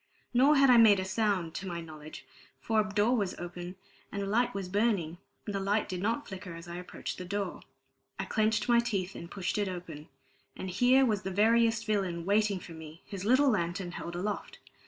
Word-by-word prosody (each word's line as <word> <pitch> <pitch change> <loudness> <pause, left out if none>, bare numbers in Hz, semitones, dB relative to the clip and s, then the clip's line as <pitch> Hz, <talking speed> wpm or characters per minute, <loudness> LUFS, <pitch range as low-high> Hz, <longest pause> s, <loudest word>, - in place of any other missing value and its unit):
Nor 270 +5 +5
had 275 -2 +6
I 245 - +7
made 215 -4 +7
a 185 - -2
sound, 190 -4 0
to 190 - -5
my 170 -2 -4
knowledge; 155 -2 -10 0.3
for 225 -1 +1
a 210 - -4
door 210 +4 +2
was 200 -6 -1
open, 175 +1 -7 0.4
and 200 - -3
a - - -2
light 240 +5 +1
was 195 -2 -3
burning, 190 -5 0 0.3
and 205 - -4
the 195 - -1
light 200 +2 0
did 180 -1 -4
not 230 +8 -1
flicker 185 -3 -7
as 165 +1 -10
I 170 0 -6
approached 180 0 -6
the - - -5
door. 200 +1 -3 0.6
I - - -3
clenched 215 -1 +1
my 240 -1 +5
teeth 200 -6 -1
and 170 - -9
pushed 190 +2 -2
it 205 - 0
open; 170 -4 -7 0.5
and 190 - -5
here 255 +7 +4
was 210 -5 0
the 190 - -4
veriest 225 +3 +3
villain 190 -6 -1
waiting 205 0 +2
for 175 - -11
me, 160 0 -11
his 195 -2 -6
little 260 +4 +5
lantern 175 -2 -2
held 175 0 -6
aloft. 200 +4 -4
200 Hz, 210 wpm, -30 LUFS, 180-220 Hz, 0.6 s, I